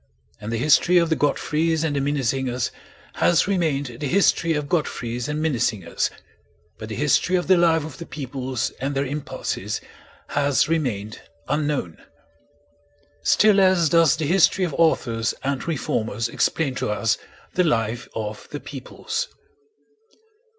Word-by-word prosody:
And 105 Hz, +1 st, -6 dB
the 115 Hz, -, -1 dB
history 155 Hz, +7 st, +4 dB
of 170 Hz, -1 st, +3 dB
the -, -, +4 dB
Godfreys 155 Hz, +2 st, 0 dB
and 155 Hz, -3 st, 0 dB
the 140 Hz, -, +1 dB
Minnesingers 130 Hz, -3 st, -1 dB, 0.5 s
has 175 Hz, +1 st, +3 dB
remained 145 Hz, -10 st, -1 dB
the 145 Hz, -, -2 dB
history 165 Hz, -1 st, +3 dB
of 150 Hz, -1 st, -2 dB
Godfreys 125 Hz, -7 st, -2 dB
and 150 Hz, 0 st, -2 dB
Minnesingers, 120 Hz, -, 0 dB, 0.7 s
but 110 Hz, -, -7 dB
the 110 Hz, -, -4 dB
history 150 Hz, +5 st, +2 dB
of 175 Hz, -, +1 dB
the 190 Hz, -, +5 dB
life 165 Hz, -3 st, +3 dB
of 155 Hz, -3 st, -9 dB
the 170 Hz, -, -8 dB
peoples 130 Hz, -4 st, -3 dB
and 140 Hz, +1 st, -2 dB
their 135 Hz, +1 st, 0 dB
impulses 145 Hz, +2 st, -4 dB, 0.5 s
has 140 Hz, -1 st, +2 dB
remained 120 Hz, -10 st, -2 dB, 0.3 s
unknown. 145 Hz, -, -1 dB, 1.2 s
Still 215 Hz, -2 st, +4 dB
less 185 Hz, -4 st, +4 dB
does 165 Hz, -2 st, +5 dB
the 160 Hz, -, -2 dB
history 185 Hz, +3 st, +4 dB
of 165 Hz, -, -4 dB
authors 120 Hz, -8 st, +1 dB
and 140 Hz, +1 st, -2 dB
reformers 115 Hz, -7 st, -1 dB
explain 140 Hz, +3 st, 0 dB
to -, -, -1 dB
us 105 Hz, +1 st, 0 dB, 0.3 s
the 180 Hz, -, +3 dB
life 120 Hz, -6 st, 0 dB
of 105 Hz, -1 st, -5 dB
the 145 Hz, -, -5 dB
peoples. 450 Hz, -, -5 dB
145 Hz, 145 wpm, -23 LUFS, 125-165 Hz, 1.2 s, the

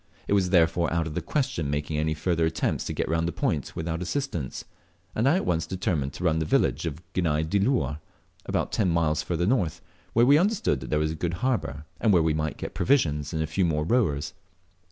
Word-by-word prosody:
It -, -, +1 dB
was 95 Hz, -3 st, +3 dB
therefore 85 Hz, -1 st, +3 dB
out 85 Hz, 0 st, +1 dB
of 80 Hz, -, -5 dB
the -, -, -2 dB
question 130 Hz, -, -1 dB
making 75 Hz, +1 st, -2 dB
any 80 Hz, 0 st, 0 dB
further 80 Hz, 0 st, +1 dB
attempts 80 Hz, -, -1 dB
to -, -, -3 dB
get -, -, -2 dB
round 80 Hz, +1 st, 0 dB
the -, -, -1 dB
point 75 Hz, -4 st, -2 dB
without 80 Hz, +1 st, -3 dB
assistance, 90 Hz, -, -3 dB, 0.5 s
and 115 Hz, +5 st, +2 dB
I 155 Hz, -, +4 dB
at 190 Hz, -, 0 dB
once 80 Hz, -2 st, 0 dB
determined 80 Hz, -7 st, -1 dB
to -, -, -7 dB
run 80 Hz, -2 st, +2 dB
to -, -, +1 dB
the 80 Hz, -, -2 dB
village -, -, +2 dB
of 80 Hz, +2 st, -6 dB
Gani 80 Hz, -4 st, +1 dB
diluar, 100 Hz, -, +1 dB, 0.5 s
about -, -, -1 dB
ten 100 Hz, -5 st, +1 dB
miles 80 Hz, -2 st, +1 dB
further 85 Hz, +2 st, -1 dB
north, 90 Hz, -, +1 dB, 0.3 s
where 115 Hz, +1 st, +5 dB
we 140 Hz, +4 st, +6 dB
understood 190 Hz, -, +1 dB
there 65 Hz, +4 st, -2 dB
was 75 Hz, 0 st, +1 dB
a -, -, -3 dB
good 85 Hz, +2 st, -2 dB
harbour, 115 Hz, -, -1 dB
and 110 Hz, -, +3 dB
where 90 Hz, -4 st, +5 dB
we 80 Hz, -1 st, +2 dB
might 75 Hz, 0 st, -2 dB
get -, -, -6 dB
provisions 75 Hz, -, +1 dB
and 80 Hz, 0 st, -1 dB
a -, -, 0 dB
few 80 Hz, +5 st, 0 dB
more 75 Hz, -3 st, +1 dB
rowers. 85 Hz, -, +1 dB
80 Hz, 220 wpm, -26 LUFS, 75-95 Hz, 0.5 s, we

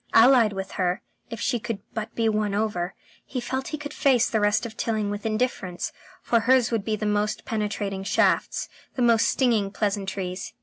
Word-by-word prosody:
Allied 235 Hz, -2 st, +7 dB
with 195 Hz, -1 st, -5 dB
her, 180 Hz, 0 st, 0 dB, 0.3 s
if 230 Hz, -2 st, -6 dB
she 245 Hz, +1 st, 0 dB
could 230 Hz, -1 st, -3 dB, 0.2 s
but 220 Hz, 0 st, -5 dB
be 230 Hz, -1 st, +1 dB
won 210 Hz, -2 st, +1 dB
over, 200 Hz, -4 st, -1 dB, 0.3 s
he 260 Hz, -, -4 dB
felt 260 Hz, +2 st, -3 dB
he 305 Hz, -, -3 dB
could 290 Hz, 0 st, -7 dB
face 255 Hz, -4 st, +3 dB
the 220 Hz, -, 0 dB
rest 205 Hz, +2 st, +2 dB
of 225 Hz, -2 st, -7 dB
Tilling 215 Hz, -3 st, -1 dB
with 205 Hz, +2 st, -3 dB
indifference, 215 Hz, -5 st, -2 dB, 0.3 s
for 235 Hz, -, +3 dB
hers 250 Hz, +1 st, +3 dB
would 225 Hz, -3 st, 0 dB
be 215 Hz, +1 st, 0 dB
the 215 Hz, 0 st, -4 dB
most 210 Hz, 0 st, 0 dB
penetrating 205 Hz, -3 st, -2 dB
shafts, -, -, +1 dB, 0.3 s
the 255 Hz, -, +1 dB
most 230 Hz, -1 st, +4 dB
stinging 230 Hz, -6 st, +2 dB
pleasantries. 195 Hz, -3 st, -3 dB
215 Hz, 185 wpm, -25 LUFS, 205-235 Hz, 0.3 s, Allied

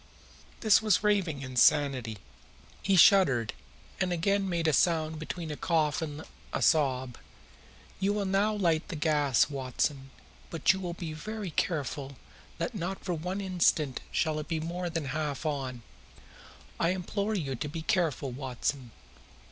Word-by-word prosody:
This 215 Hz, -2 st, +5 dB
was 215 Hz, -2 st, +2 dB
raving 185 Hz, -9 st, +1 dB
insanity. 130 Hz, -3 st, +2 dB, 0.6 s
He 195 Hz, -, +2 dB
shuddered, 145 Hz, -, +5 dB, 0.5 s
and 185 Hz, -1 st, 0 dB
again 195 Hz, +3 st, +1 dB
made 170 Hz, -2 st, 0 dB
a 155 Hz, -, +3 dB
sound 160 Hz, 0 st, +2 dB
between 160 Hz, 0 st, -5 dB
a -, -, -3 dB
cough 155 Hz, -2 st, +1 dB
and 155 Hz, -1 st, -5 dB, 0.3 s
a -, -, -1 dB
sob. 130 Hz, -5 st, +2 dB, 0.8 s
"You 195 Hz, +1 st, +1 dB
will 205 Hz, -1 st, -1 dB
now 195 Hz, +3 st, +2 dB
light 170 Hz, -7 st, +1 dB
the 170 Hz, -, -5 dB
gas, 150 Hz, -4 st, +2 dB
Watson, 135 Hz, 0 st, -2 dB, 0.4 s
but 165 Hz, +2 st, +3 dB
you 190 Hz, -, -5 dB
will 175 Hz, -2 st, -4 dB
be 165 Hz, -3 st, -5 dB
very 210 Hz, +3 st, -5 dB
careful 140 Hz, -3 st, -2 dB, 0.4 s
that -, -, -2 dB
not 190 Hz, -1 st, -4 dB
for 180 Hz, -, -1 dB
one 180 Hz, +5 st, -3 dB
instant 170 Hz, -7 st, +1 dB
shall 155 Hz, -2 st, 0 dB
it 150 Hz, -, -6 dB
be 160 Hz, -1 st, -1 dB
more 175 Hz, +2 st, -3 dB
than 165 Hz, -3 st, -3 dB
half 150 Hz, +1 st, -3 dB
on. 130 Hz, -5 st, -3 dB, 1.0 s
I 170 Hz, -, +2 dB
implore 200 Hz, +4 st, -1 dB
you 145 Hz, -8 st, -2 dB
to 130 Hz, +4 st, -4 dB
be 160 Hz, +1 st, -5 dB
careful, 165 Hz, -, 0 dB
Watson. 130 Hz, 0 st, -3 dB
160 Hz, 150 wpm, -29 LUFS, 140-185 Hz, 1.0 s, This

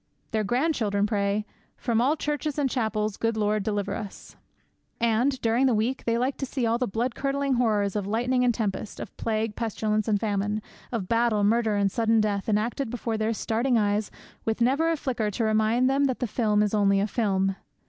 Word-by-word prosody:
Their 220 Hz, -1 st, 0 dB
grandchildren 225 Hz, -4 st, +1 dB
pray, 205 Hz, 0 st, 0 dB, 0.3 s
'From 235 Hz, -2 st, 0 dB
all 275 Hz, +5 st, +3 dB
churches 295 Hz, -1 st, -2 dB
and 290 Hz, -2 st, +2 dB
chapels, 215 Hz, -5 st, -1 dB
Good 225 Hz, -1 st, 0 dB
Lord, 210 Hz, 0 st, +1 dB
deliver 205 Hz, 0 st, -2 dB
us!' 205 Hz, -3 st, -8 dB, 0.6 s
And, 235 Hz, +4 st, +2 dB
during 235 Hz, +4 st, +3 dB
the 245 Hz, -, +3 dB
week, 235 Hz, +5 st, -1 dB
they 230 Hz, 0 st, +1 dB
like 255 Hz, +3 st, 0 dB
to 270 Hz, -, -2 dB
see 260 Hz, -2 st, -2 dB
all 230 Hz, +1 st, +1 dB
the 250 Hz, -, 0 dB
blood 235 Hz, +5 st, -1 dB
curdling 275 Hz, 0 st, -1 dB
horrors 215 Hz, -5 st, +1 dB
of 205 Hz, -2 st, -2 dB
lightning 245 Hz, +4 st, +1 dB
and 245 Hz, -, +4 dB
tempest; 215 Hz, -2 st, -3 dB
of -, -, -8 dB
plague, 220 Hz, -1 st, -2 dB
pestilence, 215 Hz, -1 st, -1 dB
and 210 Hz, -2 st, +2 dB
famine; 205 Hz, 0 st, -1 dB, 0.3 s
of 220 Hz, -6 st, -3 dB
battle, 230 Hz, -2 st, +2 dB
murder, 220 Hz, 0 st, +2 dB
and 200 Hz, -1 st, +2 dB
of -, -, -20 dB
sudden 225 Hz, 0 st, +2 dB
death, 205 Hz, -1 st, 0 dB
enacted 225 Hz, +5 st, 0 dB
before 230 Hz, -1 st, -3 dB
their 220 Hz, +1 st, 0 dB
starting 230 Hz, +3 st, 0 dB
eyes 205 Hz, -1 st, +1 dB, 0.3 s
with 225 Hz, +1 st, -1 dB
never 275 Hz, +7 st, +2 dB
a 330 Hz, -, +1 dB
flicker 240 Hz, -7 st, -1 dB
to 210 Hz, +3 st, -2 dB
remind 220 Hz, +3 st, +2 dB
them 275 Hz, +1 st, +2 dB
that 260 Hz, -3 st, 0 dB
the 250 Hz, -, -1 dB
film 210 Hz, -2 st, +1 dB
is 210 Hz, -, -1 dB
only 200 Hz, -2 st, +3 dB
a 200 Hz, -, +2 dB
film. 195 Hz, -4 st, 0 dB
225 Hz, 200 wpm, -26 LUFS, 210-245 Hz, 0.6 s, and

